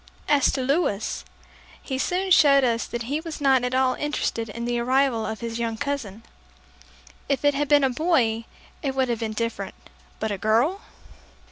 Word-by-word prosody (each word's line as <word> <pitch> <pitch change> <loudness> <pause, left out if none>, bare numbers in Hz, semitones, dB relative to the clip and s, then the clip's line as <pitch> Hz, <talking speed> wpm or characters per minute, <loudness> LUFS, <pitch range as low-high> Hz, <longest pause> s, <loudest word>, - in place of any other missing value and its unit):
As 290 -2 +4
to 265 - -1
Louis, 255 - 0 0.6
he 265 -2 -4
soon 370 +5 -1
showed 280 -5 +6
us 235 -2 +1
that 235 0 -4
he 280 +6 -2
was 325 -1 -7
not 265 -3 +3
at 250 +1 -1
all 260 -1 +3
interested 250 -6 -2
in 235 +3 -5
the 240 0 -1
arrival 250 -2 +1
of 220 +1 -5
his 230 0 -4
young 230 -1 -2
cousin. 240 -6 -4 1.1
If 275 0 0
it 290 - +5
had 290 +1 -1
been 290 -1 +5
a 265 - +4
boy, 245 -7 +1 0.4
it 270 -3 -2
would 260 -1 +1
have 235 -2 -1
been 220 -2 -3
different 230 +1 -3 0.4
but 220 - -2
a 200 - -3
girl! 240 - +2
255 Hz, 180 wpm, -24 LUFS, 230-285 Hz, 1.1 s, showed